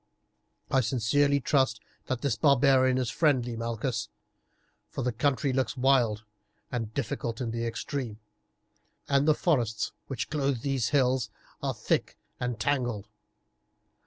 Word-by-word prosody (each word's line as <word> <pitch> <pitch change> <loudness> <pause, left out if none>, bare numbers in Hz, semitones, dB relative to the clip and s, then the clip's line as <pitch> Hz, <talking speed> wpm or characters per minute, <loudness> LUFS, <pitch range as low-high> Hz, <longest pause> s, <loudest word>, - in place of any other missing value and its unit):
"I 135 - +4
sincerely 135 +5 +2
trust 130 -5 +2 0.3
that 130 -2 -2
this 140 -6 +1
barbarian 130 -1 +4
is 125 -2 -1
friendly, 130 -7 +2
Malchus, 115 +1 -2 0.8
for 135 - -4
the 125 - +1
country 135 +3 0
looks 130 +1 -1
wild 125 -5 +3 0.5
and 115 -3 -3
difficult 115 -3 -3
in 120 -3 -2
the 115 0 -2
extreme, 120 -2 -4 0.9
and 140 +1 +2
the 155 - +5
forests 120 -12 0 0.2
which 130 -4 -4
clothe 140 -5 0
these 135 -4 0
hills 130 -5 +2 0.3
are - - -1
thick - - -1 0.2
and 125 -2 -2
tangled. 120 -5 -1
130 Hz, 130 wpm, -28 LUFS, 115-140 Hz, 0.9 s, the